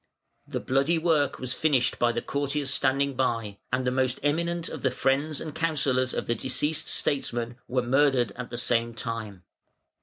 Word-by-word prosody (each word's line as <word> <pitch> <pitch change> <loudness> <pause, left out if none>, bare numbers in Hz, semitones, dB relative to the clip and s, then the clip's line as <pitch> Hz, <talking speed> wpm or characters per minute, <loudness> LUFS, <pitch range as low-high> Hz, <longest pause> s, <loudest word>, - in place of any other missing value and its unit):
The - - -3
bloody 135 +6 +1
work 155 -4 +2
was 130 0 -2
finished 135 -5 +1
by 120 0 +3
the 120 0 -3
courtiers 140 0 -1
standing 140 +1 +2
by, 115 -6 -1
and 130 0 0
the 125 - +2
most 130 0 0
eminent 170 +3 0
of - - -6
the 130 - +2
friends 135 +4 0
and 155 -2 -6
counsellors 140 -6 +1
of - - -2
the 120 - +1
deceased 150 +6 -1
statesman 120 -4 -1
were 125 0 0
murdered 130 -3 +3
at 125 +4 -7
the 120 - -5
same 115 -1 +1
time. 110 -5 -5
130 Hz, 175 wpm, -27 LUFS, 120-145 Hz, -, by